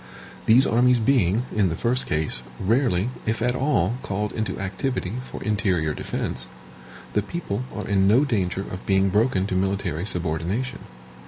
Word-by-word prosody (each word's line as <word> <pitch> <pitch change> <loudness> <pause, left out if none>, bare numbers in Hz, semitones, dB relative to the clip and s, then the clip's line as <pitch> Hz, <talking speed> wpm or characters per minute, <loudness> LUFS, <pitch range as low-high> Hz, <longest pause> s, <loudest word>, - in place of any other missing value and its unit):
These 125 +5 +6
armies 125 +1 +4
being, 115 -3 +2
in 100 -4 +3
the 80 - -2
first 125 +8 0
case, 75 -5 0 0.2
rarely, 115 -1 +1 0.2
if 110 0 0
at 125 +2 +1
all, 120 - +1
called 105 +2 -2
into 110 -1 -2
activity 100 +2 -2
for 130 - -8
interior 95 -7 +1
defense, - - -3 0.7
the 105 - +2
people 125 -3 -4
are 105 - -5
in 95 -2 +3
no 120 +8 +5
danger 95 -8 0
of 95 -1 -7
being 95 0 +3
broken 105 -1 +2
to 100 - -3
military 95 -2 -1
subordination. 90 - -2
105 Hz, 155 wpm, -24 LUFS, 95-120 Hz, 0.7 s, These